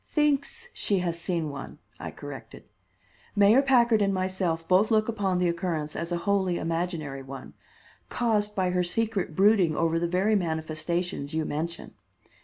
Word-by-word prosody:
"Thinks 300 - 0
she 200 - 0
has 170 -1 -2
seen 170 -3 -1
one," 140 -1 -8 0.2
I - - -5
corrected. - - -10 0.7
"Mayor 205 +6 +6
Packard 240 -5 +4
and 200 -1 +2
myself 185 -3 -1
both 190 +4 +4
look 215 -1 +3
upon 200 -5 0
the 180 0 +2
occurrence 170 -3 -2
as 170 +1 -4
a 175 - +1
wholly 190 -3 +1
imaginary 165 -4 -3
one, 135 0 -9 0.6
caused 210 -3 0
by 185 -2 +1
her 180 0 +1
secret 195 -2 -1
brooding 195 -4 +4
over 165 +1 +1
the 170 - 0
very 185 +5 +1
manifestations 160 -2 -2
you 160 -1 0
mention. 165 +3 -4
180 Hz, 155 wpm, -27 LUFS, 165-205 Hz, 0.7 s, Mayor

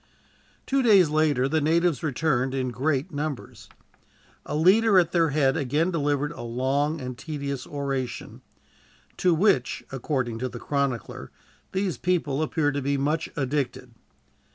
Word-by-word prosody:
Two 275 0 +1
days 200 - +5
later, 150 -4 +2
the 155 +3 +1
natives 165 -1 +2
returned 135 -3 0
in 130 -1 -1
great 140 +3 -1
numbers. 145 -2 -5 0.8
A - - -3
leader 195 +6 +5
at 170 -2 +4
their 165 -2 +3
head 140 -1 +2
again 155 +4 0
delivered 145 -2 0
a 160 - -9
long 135 +6 -1
and 125 -2 -5
tedious 140 0 -5
oration, 135 -3 -4 0.8
"to 180 -2 +3
which," 155 - +2
according 130 -3 -2
to 130 +1 -2
the - - -8
chronicler, 140 -4 -3 0.4
"these 190 -2 -2
people 160 -6 0
appear 155 -1 +1
to 145 0 -2
be 140 +1 0
much 150 +4 -1
addicted." 135 -3 -2
145 Hz, 140 wpm, -25 LUFS, 135-160 Hz, 0.8 s, days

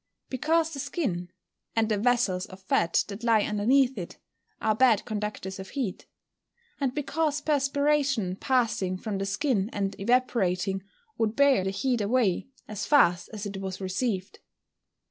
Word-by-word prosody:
_ - - -49
Because 320 +5 +1
the 285 - -6
skin, 185 - -2 0.5
and 225 -1 +2
the 215 -1 +1
vessels 220 -6 +1
of 185 - -12
fat 170 -2 +2
that 205 +3 -8
lie 225 -3 +4
underneath 250 +6 +2
it, - - -7 0.4
are 220 - +2
bad 230 -2 +4
conductors 210 -3 -4
of 190 - -8
heat. 250 -10 -4 0.7
And 270 -3 -1
because 300 +1 0
perspiration 280 -7 +1
passing 230 -8 0
from 200 0 -4
the 195 - -2
skin 200 0 0
and 200 -1 -2
evaporating, 195 -5 +1 0.4
would 220 0 +1
bear 280 -8 +4
the 190 - -1
heat 235 +5 0
away 210 -1 +1 0.2
as 215 0 -5
fast 180 -12 +4
as 210 -1 -6
it 200 -1 -5
was 190 -1 -5
received. 190 0 -2
220 Hz, 150 wpm, -27 LUFS, 195-265 Hz, 0.7 s, lie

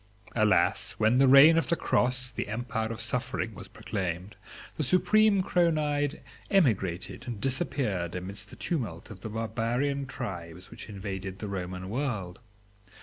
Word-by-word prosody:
Alas, 110 -2 +2
when 110 +4 +2
the 135 - +6
reign 145 +5 +8
of - - -3
the 170 - +3
Cross, 125 -4 +1
the 115 - -4
empire 110 0 -3
of 115 - -6
suffering, 120 0 -1
was - - -9
proclaimed, 95 0 -4 0.4
the 155 - -1
supreme 200 - +4
Chronide 150 -5 +1 0.3
emigrated 100 - +1
and 115 -4 -5
disappeared 105 - -1
amidst 95 +3 -6
the - - -11
tumult 110 - -4
of 95 -3 -11
the 110 - -5
barbarian 115 +5 -1
tribes 90 -8 -7
which - - -9
invaded 95 -2 -5
the 105 - -6
Roman 90 -1 -5
world. 105 -6 -3
115 Hz, 145 wpm, -28 LUFS, 95-135 Hz, 0.4 s, reign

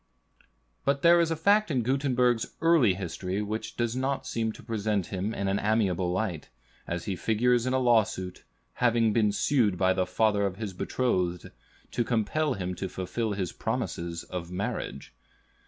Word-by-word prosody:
But 140 0 0
there 170 0 +7
is 170 -1 +2
a 165 - 0
fact 205 +6 +3
in 130 -6 +1
Gutenberg's 125 -2 +1
early 160 - +4
history 95 +2 -3
which 110 +2 -5
does 120 0 0
not 135 +1 -1
seem 110 -1 -1
to - - -13
present 105 -4 -1
him 95 +3 -1
in 100 -3 -2
an 95 +1 +1
amiable 95 -5 +1
light, 90 -5 -2 0.4
as 85 -1 -3
he 95 - -2
figures 120 +5 +2
in 130 - 0
a - - +3
lawsuit, 110 -7 +1 0.4
having 115 -2 +3
been 105 -2 +3
sued 105 -3 +2
by 95 0 +3
the 95 -1 0
father 105 +2 +2
of 95 - -5
his 105 -3 -5
betrothed, 90 -4 -1 0.4
to 120 - 0
compel 125 +6 0
him 90 -2 -3
to 95 0 -3
fulfill 100 +5 -3
his 95 -3 -2
promise 85 0 -3
of 85 -2 -6
marriage. 90 - -4
110 Hz, 170 wpm, -28 LUFS, 95-125 Hz, 0.4 s, there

